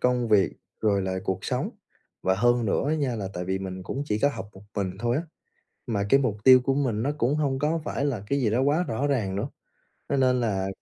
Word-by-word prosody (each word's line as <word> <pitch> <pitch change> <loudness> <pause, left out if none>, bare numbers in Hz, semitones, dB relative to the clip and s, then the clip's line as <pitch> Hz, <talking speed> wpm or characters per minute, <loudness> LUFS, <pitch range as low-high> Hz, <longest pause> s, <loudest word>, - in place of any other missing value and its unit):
công 125 -2 +1
việc 100 -4 +4 0.3
rồi 100 -3 +2
lại 95 0 -2
cuộc 95 -1 -2
sống. - - -1 0.5
Và 95 - +2
hơn 120 +3 +3
nữa 100 - +1
á 155 - +2
nha 135 -6 -1
là 100 -3 -3
tại 90 0 -3
vì 95 +1 -1
mình 95 -1 -6
cũng 135 +9 -4
chỉ 105 0 0
có 140 - +4
học 115 -6 -6
một 95 - -14
mình 95 -2 0
thôi 120 +3 0
á, 155 - 0 0.7
mà 100 -4 0
cái 135 - +6
mục 115 -6 0
tiêu 130 -1 +9
của 135 +2 +1
mình 120 -6 0
nó 145 - +1
cũng 135 +4 +1
hông 140 -3 0
có 160 +2 0
phải 140 - -1
là 125 -9 -2
cái 140 - +1
gì 115 - +2
đó 120 +4 +1
quá 150 +6 +2
rõ 130 +6 0
ràng 110 -9 0
nữa, 110 +8 -2 0.6
cho 140 - +1
nên 130 -1 +3
là 95 -4 0
120 Hz, 250 wpm, -26 LUFS, 100-135 Hz, 0.7 s, tiêu